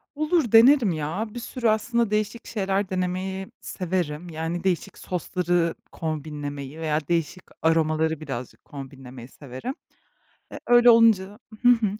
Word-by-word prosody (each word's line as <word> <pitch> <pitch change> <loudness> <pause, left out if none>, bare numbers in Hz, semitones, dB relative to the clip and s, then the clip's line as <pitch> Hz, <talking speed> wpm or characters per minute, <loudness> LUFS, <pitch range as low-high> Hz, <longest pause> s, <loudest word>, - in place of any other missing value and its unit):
Olur, 310 - +1
denerim 235 -1 +7
ya. 160 +7 -2
Bir 240 - -5
sürü 240 0 -2
aslında 225 +1 +1
değişik 215 +2 -1
şeyler 195 -2 -1
denemeyi 185 +1 -2
severim. 175 -3 -3
Yani 165 +2 -4
değişik 185 -3 -1
sosları 175 -2 -1 0.2
kombinlemeyi 150 -2 -5
veya 155 -1 0
değişik 170 +1 -1 0.2
aromaları 160 -1 +2
birazcık 135 -5 -7
kombinlemeyi 135 -3 -10
severim. 135 - -7 0.8
Eee, - - -7
öyle 240 0 +7
olunca 215 -3 +4 0.2
Hı 245 - +5
hı. 235 -3 +5
180 Hz, 125 wpm, -25 LUFS, 155-215 Hz, 0.8 s, denerim